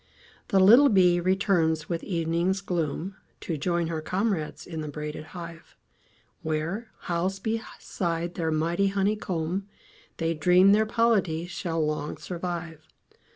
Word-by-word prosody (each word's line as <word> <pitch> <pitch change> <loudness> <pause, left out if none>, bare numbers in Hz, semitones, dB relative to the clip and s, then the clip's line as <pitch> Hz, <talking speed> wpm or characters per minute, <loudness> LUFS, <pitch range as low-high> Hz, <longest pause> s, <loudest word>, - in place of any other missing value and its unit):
The 195 - +3
little 235 +10 +8
bee 180 -4 +4
returns 175 -4 +1
with 170 -2 -2
evening's 170 +2 0
gloom, 175 +1 -3 0.2
To 165 - -3
join 170 +3 0
her 160 -1 -3
comrades 185 -2 -2
in 160 -3 -5
the 155 - -5
braided 150 +1 -6
hive, 170 -1 -10 0.6
Where, 165 +9 -3
housed 185 +2 -2
beside 175 -6 -3
their 165 -2 -2
mighty 170 +5 +1
honeycomb, 195 -2 -1 0.5
They 165 0 0
dream 180 +5 +5
their 215 +1 +4
polity 210 -8 +1
shall 165 -2 -2
long 150 -1 -3
survive. 170 -3 -6
175 Hz, 125 wpm, -27 LUFS, 160-195 Hz, 0.6 s, little